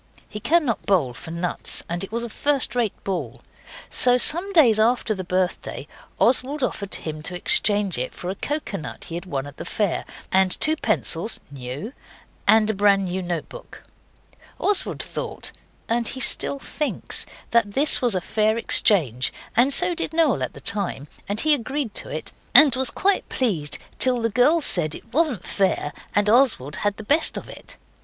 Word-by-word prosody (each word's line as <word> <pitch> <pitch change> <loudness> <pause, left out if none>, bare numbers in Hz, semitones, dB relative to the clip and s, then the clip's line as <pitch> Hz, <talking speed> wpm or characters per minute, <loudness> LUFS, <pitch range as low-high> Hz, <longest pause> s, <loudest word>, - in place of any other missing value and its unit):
He 210 - -8
cannot 295 -3 0
bowl 165 -11 +1
for 160 +7 -10
nuts, 170 +1 -2
and 175 +2 -4
it 195 - -8
was 235 +1 -3
a 235 - -5
first 280 +2 +1
rate 235 -5 -2
ball. 160 - -5 0.5
So 245 0 +4
some 345 +9 +1
days 255 - +5
after 230 0 +1
the 190 -2 -6
birthday 180 0 -3 0.3
Oswald 265 +3 +2
offered 200 -5 -3
him 155 -1 -6
to 180 +3 -3
exchange 205 - +2
it 130 - -4
for 180 - -5
a 195 - -10
coconut 210 - -5
he - - -9
had 175 +2 -6
won 135 -5 -3
at 145 -1 -12
the - - -6
fair, 205 -5 -2 0.3
and 190 -1 +2
two 310 0 +3
pencils 215 - 0
(new), 140 - -7 0.5
and 215 +1 +5
a 220 - 0
brand 200 -1 +2
new 185 +1 -3
note 175 -3 -4
book. - - -13 0.7
Oswald 410 -2 +1
thought, - - -5 0.4
and 230 0 0
he 265 - -4
still 270 +2 +2
thinks, 300 +2 -2 0.2
that 225 -4 +2
this 285 +5 +6
was 240 -5 +2
a 185 - -1
fair 215 +4 0
exchange, 145 - +4 0.2
and 245 +4 +4
so 355 +5 +3
did 325 - -3
Noel 310 - +2
at 130 - -3
the 140 - -11
time, 180 -6 -2 0.2
and 205 +1 0
he 310 -1 +4
agreed 265 -2 -2
to - - -5
it, - - -5 0.2
and 285 -5 +8
was 260 0 +2
quite 400 0 0
pleased 170 - -1 0.2
till 255 -1 +3
the 230 -1 -1
girls 290 +8 +3
said 155 -4 0
it 230 - -14
wasn't 285 - 0
fair, 190 -6 -1 0.2
and 205 0 +2
Oswald 220 - +2
had 205 -1 -1
the 220 - -7
best 295 +9 +2
of - - -7
it. - - -12
215 Hz, 180 wpm, -22 LUFS, 180-260 Hz, 0.7 s, and